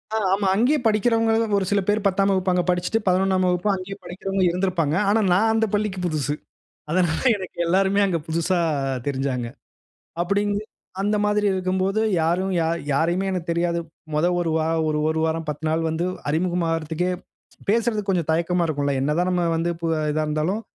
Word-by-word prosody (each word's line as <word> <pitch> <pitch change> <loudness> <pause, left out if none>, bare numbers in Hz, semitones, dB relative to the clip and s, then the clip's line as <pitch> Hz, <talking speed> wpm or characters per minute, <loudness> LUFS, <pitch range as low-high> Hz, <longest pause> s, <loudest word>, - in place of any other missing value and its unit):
ஆ - - +2 0.2
ஆமா. 200 0 +1
அங்கேயே 265 +8 +3
படிக்கிறவங்களும், 225 0 +2
ஒரு 190 - 0
சில 200 - +3
பேர் 205 0 +1
10ஆம் 195 +1 +2
வகுப்பு 185 -1 +1
அங்க 180 -1 +2
படிச்சுட்டு, 180 +5 +1
11ஆம் 185 0 +2
வகுப்பும் 180 +3 +1
அங்கேயே 190 +1 -7
படிக்கிறவங்க 195 +1 -2
இருந்திருப்பாங்க. 175 -4 0
ஆனா, 220 +1 +3
நான் 220 +4 +3
அந்த 225 0 +2
பள்ளிக்கு 205 -3 -1
புதுசு. 150 -3 -1 0.6
அதனால 175 -2 +1 0.2
எனக்கு 185 -3 -9
எல்லாருமே 195 +3 +2
அங்க 175 -3 0
புதுசா 170 +3 0 0.5
தெரிஞ்சாங்க. 130 -3 -1 0.8
அப்படிங்கு 205 +3 0 0.4
அந்த 210 +1 +1
மாதிரி 210 0 +1
இருக்கும்போது 190 +3 0 0.2
யாரும் 185 +4 0
யா 160 - +1 0.3
யாரையுமே 175 +6 +1
எனக்கு 175 -2 -4
தெரியாது. 170 0 0 0.3
மொத 155 +3 +2
1 165 -2 0
வாரம், 160 0 0
ஒரு 150 0 0
1 160 0 0
வாரம் 160 0 -2
10 150 +2 -4
நாள் 165 +1 0
வந்து 165 +2 -1 0.2
அறிமுகமாகறதுக்கே 165 0 0 0.6
பேசுறதுக்கு 215 -2 +1
கொஞ்சம் 170 -4 -1
தயக்கமா 170 +1 +1
இருக்கும்ல! 145 -2 -1
என்னதான் 160 +6 +1
நம்ம 175 -1 +1
வந்து, 165 +1 0
பு 165 - -1
அ - - -1
இதாருந்தாலும், 155 +7 -1
180 Hz, 160 wpm, -23 LUFS, 165-200 Hz, 0.8 s, அங்கேயே